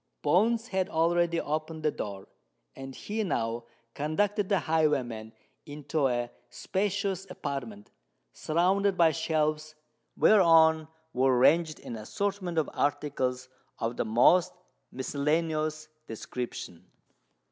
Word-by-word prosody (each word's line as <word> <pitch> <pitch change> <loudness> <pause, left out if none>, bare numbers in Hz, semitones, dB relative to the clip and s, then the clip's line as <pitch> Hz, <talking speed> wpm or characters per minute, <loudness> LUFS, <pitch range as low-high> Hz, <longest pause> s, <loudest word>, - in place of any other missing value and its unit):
Bones 225 +5 +2
had 190 -2 -1
already 170 +1 +1
opened 155 +1 -4
the 155 - +2
door; 100 -6 -6 0.5
and 135 0 -8
he 215 +1 -3
now 115 - -2 0.3
conducted 200 +7 -1
the 200 - +3
highwayman 130 -9 0 0.4
into 150 0 -1
a 120 -1 -2 0.2
spacious 195 - -2
apartment, 115 -7 -6 0.4
surrounded 185 +4 +1
by 165 -2 +5
shelves, 155 0 -1 0.4
whereon 160 -5 +5 0.3
were 130 0 +3
ranged 155 +5 +3
an 115 - -7
assortment 185 - -3
of 160 - +2
articles 130 -3 -1 0.3
of 115 +1 -2
the - - -1
most 165 +11 +4 0.4
miscellaneous 155 +3 -1 0.2
description. 115 -6 -6
155 Hz, 105 wpm, -28 LUFS, 130-180 Hz, 0.5 s, by